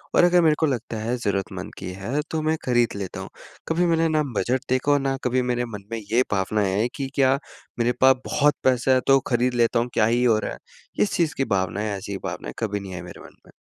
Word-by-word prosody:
और - - +6
अगर 175 0 +5
मेरे 155 -2 +4
को 160 - +3
लगता 120 -5 -2
है 115 +3 -1
ज़रूरतमंद 95 -4 -3
की 90 -1 -6
है 130 +10 -2
तो 160 - -1
मैं 155 +1 +1
खरीद 120 -2 +2
लेता 95 -2 -5
हूँ। - - -7 0.4
कभी 170 +2 +1
मैंने 165 -1 +2
न 150 - +2
बजट 130 +1 +1
देखा 130 +3 +2
और 145 - +4
न 135 0 0
कभी 125 +1 +1
मेरे 120 0 0
मन 105 -4 -8
में 115 - -2
ये 110 +4 +1
भावना 105 +2 0
है 100 +4 +1
कि 135 - -3
क्या 135 0 +4 0.4
मेरे 120 +1 +2
पास 130 0 +7
बहुत 145 0 +3
पैसा 130 0 +3
है 130 - +3
तो 135 0 +6
खरीद 125 +1 +1
लेता 120 0 +2
हूँ 120 +1 -1
क्या 105 - +3
ही 120 +2 +2
हो 115 -3 +4
रहा - - -4
है? - - -9 0.4
इस 205 - +2
चीज़ 160 -5 +1
की 135 - +1
भावनाएँ 100 +3 -1
ऐसी 100 +1 -5
भावनाएँ - - -5
कभी 105 -2 -1
नहीं 95 -1 -8
आई 85 - -6
मेरे 90 - -11
मन - - -14
में। - - -18
120 Hz, 245 wpm, -24 LUFS, 105-135 Hz, 0.4 s, पास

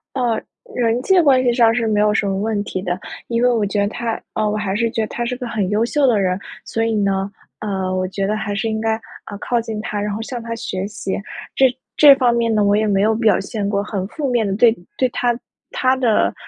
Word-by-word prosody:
呃， 240 -4 0 0.3
人 235 0 +1
际 380 +5 +4
关 270 -5 +4
系 245 - +3
上 230 -2 +4
是 230 -1 0
没 210 -1 +2
有 210 0 +3
什 215 - +1
么 195 -1 -1
问 210 0 -1
题 185 - -4
的， 180 -1 -2 0.3
因 235 0 0
为 250 - +5
我 225 -3 +1
觉 205 +1 -1
得 200 - +1
他， 230 +1 -3
呃， 215 -1 +1
我 210 - -1
还 200 -2 -2
是 230 +1 +1
觉 225 - -1
得 215 - -1
他 240 - -3
是 250 +1 -2
个 250 - -6
很 205 -5 -1
优 215 +2 +2
秀 280 +3 +2
的 225 -5 +3
人。 185 -1 +1 0.3
所 225 0 -1
以 225 - 0
呢， 195 -1 0 0.3
呃， 190 -3 -2
我 185 0 0
觉 195 +1 -2
得 215 +2 0
还 205 -1 -3
是 220 +2 -1
应 220 0 -2
该， 225 0 +1 0.4
呃， 205 - -7
靠 240 -1 0
近 220 -2 -5
他， 210 -1 -3
然 205 0 -2
后 215 - -4
向 240 0 -5
他 230 0 -4
学 190 -3 -4
习。 205 -2 -4 0.4
这 265 - +5 0.3
这 290 -2 +9
方 250 -3 +3
面 230 -1 +1
呢 210 - +3
我 200 0 +3
也 215 +1 +1
没 195 -1 +2
有 220 +2 +3
表 220 -1 +3
现 200 0 -3
过 200 -1 0
很 195 -3 -3
负 280 +2 -3
面 235 -3 +1
的， 195 - -1
对 235 0 +5 0.2
对 255 - +2
他 240 -1 0 0.3
他 255 0 +2
的， 240 -5 +2
220 Hz, 275 characters per minute, -19 LUFS, 205-235 Hz, 0.4 s, 这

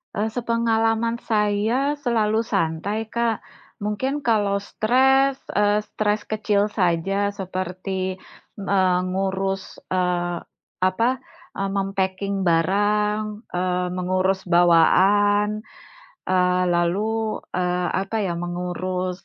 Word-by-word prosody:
Eee, 210 +2 0
sepengalaman 230 -1 +1
saya 220 +6 +1
selalu 220 -2 +1
santai, 200 +2 -1
Kak. 230 -1 0 0.4
Mungkin 235 +8 -2
kalau 205 -6 +1
stres, 265 +6 +2 0.2
eee, 205 0 +3
stres 210 0 0
kecil 210 -1 +1
saja 195 +1 0
seperti, 185 -1 -4 0.4
eee, 190 -2 +2
mengurus, 195 +1 -2
eee, 175 -1 0 0.5
apa, 185 +6 +2 0.5
eee, 195 0 -2
mem-packing 195 0 -1
barang, 205 +5 +2 0.3
eee, 180 0 0
mengurus 185 +1 0
bawaan. 200 +5 +4 0.7
Eee, 180 0 +2
lalu, 215 +6 0 0.2
eee, 180 0 0
apa 200 +3 -4
ya, 180 -4 -1
mengurus 180 +1 -3
195 Hz, 95 wpm, -23 LUFS, 185-215 Hz, 0.7 s, bawaan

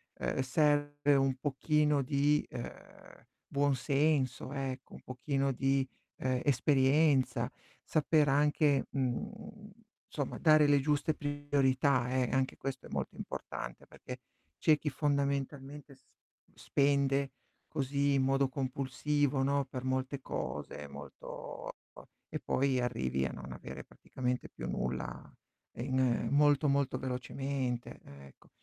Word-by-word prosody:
ehm, - - -2
serve 145 +1 +2
un 135 -1 +3
pochino 150 +1 +1
di, 145 +2 +2
ehm, - - -10 0.2
buon 140 0 +2
senso 135 -1 +1
ecco, 130 -2 -4
un - - -11
pochino 135 +2 -1
di, 135 +1 +1 0.3
ehm, 130 -1 0
esperienza, 140 +1 +3 0.4
saper 155 -1 +3
anche, 145 0 +3
mhmm, 210 - -4 0.4
insomma 145 -3 -3
dare 155 -2 +6
le 145 -1 +5
giuste 150 +2 +1
priorità 140 -3 +1
eh, 130 -1 +1
anche 130 0 0
questo 135 -1 -5
è - - -16
molto - - -3
importante - - -6
perché 125 0 -9 0.4
c'è 155 -1 +4
chi 150 - -1
fondamentalmente 140 0 -2
s 130 - -30 0.5
spende 140 -1 +1 0.4
così 140 +1 0
in 135 - +3
modo 135 +1 +3
compulsivo, 135 +1 0
no, 140 0 +1
per 130 -1 -6
molte 130 +1 -1
cose 75 - -5
molto 70 +1 -9
e - - -62
po - - -14 0.2
e - - -4
poi 135 -1 +1
arrivi 65 - 0
a 65 - -2
non - - -8
avere - - -8
praticamente 125 -1 -4
più - - -6
nulla - - -3 0.5
in 130 -1 +1
molto, 145 +1 +4
molto 140 -1 +1
velocemente 130 -1 -3
ecco. 70 -1 -15
135 Hz, 125 wpm, -32 LUFS, 130-145 Hz, 0.5 s, dare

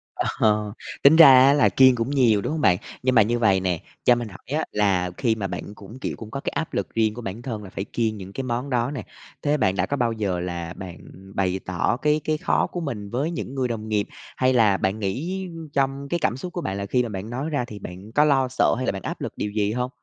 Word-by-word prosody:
Ờ, 105 -1 +1 0.3
tính 140 +3 +8
ra 165 -2 +10 0.2
á 140 - +6
là 145 -2 +4
kiêng 130 -1 +6
cũng 115 +1 -2
nhiều, 120 -7 +3
đúng - - -3
hông 155 0 -2
bạn? 90 -2 +4 0.3
Nhưng 130 0 +2
mà 110 - +8
như 120 +3 +1
vầy 100 -5 +4
nè, 90 -3 -1 0.2
cho 125 - +5
mình 120 -1 -4
hỏi 95 - -15
á - - -1
là 95 -4 +1
khi 115 -3 +1
mà 100 -3 -3
bạn 95 +3 -6
cũng, 105 +6 -12
kiểu, - - -3
cũng 110 -1 -9
có 135 - -4
cái - - -2
áp 160 - -3
lực - - -3
riêng 110 -2 +2
của 120 - -7
bản 105 +1 -6
thân 115 -4 -5
là 95 - -9
phải 95 - -4
kiêng 110 0 -2
những 95 0 -9
cái 135 - -4
món 125 +2 -3
đó 125 0 0
nè, 140 - -5 0.4
thế 145 +1 +1
bạn 95 -9 +1
đã - - +1
có 145 - -2
bao 120 -3 +1
giờ 100 -5 -2
là 85 -1 -4
bạn 90 -2 -8 0.4
bày 95 -1 0
tỏ 95 +5 0
cái 150 +3 +1
cái 155 0 0
khó - - +1
của 175 - -4
mình 115 -10 -5
với 140 +9 -1
những 160 -5 -5
người 130 -2 0
đồng 110 -2 -4
nghiệp? 105 -1 0 0.3
Hay 130 0 +3
là 110 -5 +4
bạn 95 +3 -1
nghĩ 170 - -3 0.3
trong 135 0 0
cái 170 - 0
cảm 125 - 0
xúc 180 +6 -7
của 175 - -3
bạn 95 -10 -3
là 100 - -3
khi 125 +5 +1
mà 120 - -4
bạn 100 +1 -6
nói 130 +6 -3
ra 145 -5 -1
thì 105 -3 -9
bạn 95 +3 -9
có 145 +5 +4
lo 135 -3 +3
sợ 130 0 +2
hay 130 - -2
là - - +1
bạn 95 - -6
áp - - -5
lực - - -4
điều 105 - -2
gì 105 -1 0
hông? 125 +1 -1
115 Hz, 275 wpm, -24 LUFS, 100-135 Hz, 0.4 s, ra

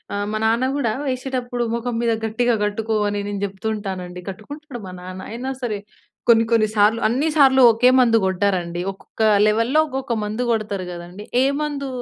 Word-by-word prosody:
ఆహ్, 205 0 -1
మా 215 - 0
నాన్న 230 +3 +2
గూడా 235 -7 0 0.2
ఎసేటప్పుడు 250 -2 -3
మొఖం 235 0 -3
మీద 235 -1 +1
గట్టిగా 235 +2 +1
కట్టుకో 220 +2 -2
అని 205 0 -2
నేను 200 -1 -4
చెప్తూ 195 +2 -6
ఉంటానండి. 185 -3 -6
కట్టుకుంటాడు 270 +6 -9
మా 185 - -8
నాన్న. 185 +1 -8
అయినా 250 +3 -4
సరే 215 -4 -2 0.5
కొన్ని, 225 -1 +6
కొన్ని 220 -2 +4
సార్లు 210 +3 +4
అన్నీ, 260 +8 0
సార్లు 265 -2 +6
ఒకే 230 +3 +4
మందు 230 -2 +5
కొట్టరండి. 180 -2 0
ఒక్కొక్క 195 +3 -10 0.3
లెవెల్లో 230 +8 +2
ఒక్కొక్క 265 -3 -3
మందు 215 +4 -2
కొడతారు 210 -4 -2
కదండీ! 175 +3 -9 0.2
ఏ - - +3 0.2
మందు 285 -2 -3
225 Hz, 170 wpm, -21 LUFS, 200-245 Hz, 0.5 s, కొన్ని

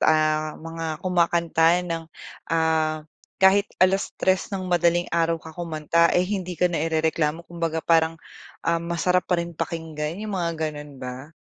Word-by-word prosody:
ah, 155 0 +2
mga 165 -1 -5
kumakanta 170 -1 +3
ng, 165 -2 -4 0.4
ah, 160 -1 +1 0.3
kahit 195 +2 +4
3:00 185 0 +2
ng 195 -2 -4
madaling 175 -1 +2
araw 165 0 +2
ka 160 0 -11
kumanta 170 0 +1
ay 180 - +2
hindi 185 -2 -3
ka 180 +1 +2
nairereklamo 160 0 0
kumbaga 165 -2 -3
parang, 165 -1 +3 0.5
ah, 170 0 +1
masarap 170 +2 0
pa 180 - +3
rin 170 0 -3
pakinggan, 160 -1 -4
'yung 215 - -4
mga 175 -3 0 0.2
gano'n 145 -1 -9
ba? 130 +2 -7
165 Hz, 140 wpm, -24 LUFS, 160-175 Hz, 0.5 s, kahit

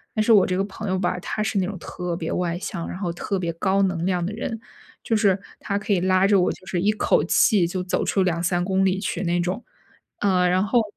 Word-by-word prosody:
但 215 - +2
是 230 - +5
我 200 -4 +6
这 185 0 -1
个 195 - +1
朋 205 +1 -6
友 185 - +1
吧， 180 -1 -1
他 215 +4 -3
是 215 -2 0
那 185 - +1
种 200 -2 -5
特 175 +1 -5
别 160 - -4
外 175 -1 -1
向， 180 -2 -5
然 - - -6
后 180 -3 -3
特 195 +3 -3
别 170 -2 -2
高 195 +3 +1
能 180 -3 0
量 180 -2 0
的 200 - -4
人， 225 0 -4 0.4
就 225 - 0
是 200 -3 +3 0.2
他 200 - -2
可 210 +1 -1
以 185 - +2
拉 185 +1 +3
着 200 -1 +4
我 - - +2
就 185 - -11
是 175 -1 -2
一 210 +2 +3
口 215 - +2
气 195 -7 +3
就 180 +1 -3
走 180 - -1
出 195 - +1
2、3 175 0 0
公 190 0 +1
里 190 0 +1
去 185 -2 -3
那 175 0 0
种。 180 +7 -2 0.6
呃， 185 -3 +3
然 185 +1 +2
后 235 +3 +3
185 Hz, 270 characters per minute, -23 LUFS, 180-200 Hz, 0.6 s, 我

